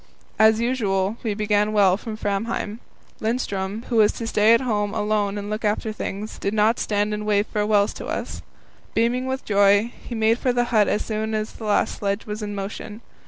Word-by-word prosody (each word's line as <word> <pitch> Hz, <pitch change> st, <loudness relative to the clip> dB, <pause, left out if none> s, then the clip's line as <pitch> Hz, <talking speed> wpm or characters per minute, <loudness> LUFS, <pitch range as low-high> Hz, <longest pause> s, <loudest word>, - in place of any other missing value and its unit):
As 220 Hz, 0 st, +6 dB
usual, 215 Hz, -4 st, 0 dB
we 215 Hz, -3 st, -2 dB
began 210 Hz, 0 st, +1 dB
well 195 Hz, -3 st, +5 dB
from 215 Hz, +1 st, -6 dB
Framheim. 210 Hz, +1 st, -2 dB, 0.4 s
Lindström, 215 Hz, -2 st, -2 dB
who 235 Hz, -, -1 dB
was 210 Hz, -1 st, +5 dB
to 230 Hz, -, -5 dB
stay 220 Hz, 0 st, +4 dB
at 230 Hz, -, +1 dB
home 210 Hz, -4 st, -1 dB
alone 210 Hz, -1 st, 0 dB
and 205 Hz, 0 st, -5 dB
look 215 Hz, +1 st, -4 dB
after 215 Hz, +1 st, 0 dB
things, 210 Hz, +1 st, -5 dB
did 200 Hz, +2 st, -2 dB
not 220 Hz, +2 st, +3 dB
stand 210 Hz, 0 st, 0 dB
and 210 Hz, 0 st, -3 dB
wave 210 Hz, -1 st, +2 dB
farewells 210 Hz, -1 st, +1 dB
to -, -, -6 dB
us. -, -, -4 dB, 0.5 s
Beaming 245 Hz, +3 st, +1 dB
with 265 Hz, 0 st, -3 dB
joy, 205 Hz, +2 st, +4 dB
he 240 Hz, -, -6 dB
made 225 Hz, +1 st, +2 dB
for 250 Hz, -, +1 dB
the 245 Hz, 0 st, +2 dB
hut 210 Hz, -2 st, +5 dB
as 210 Hz, -, 0 dB
soon 220 Hz, 0 st, -2 dB
as 215 Hz, 0 st, -3 dB
the 225 Hz, -, -9 dB
last 210 Hz, -, +1 dB
sledge 200 Hz, +1 st, -2 dB
was 210 Hz, +1 st, -5 dB
in 205 Hz, -1 st, -4 dB
motion. 205 Hz, +2 st, -6 dB
215 Hz, 200 wpm, -23 LUFS, 205-225 Hz, 0.5 s, As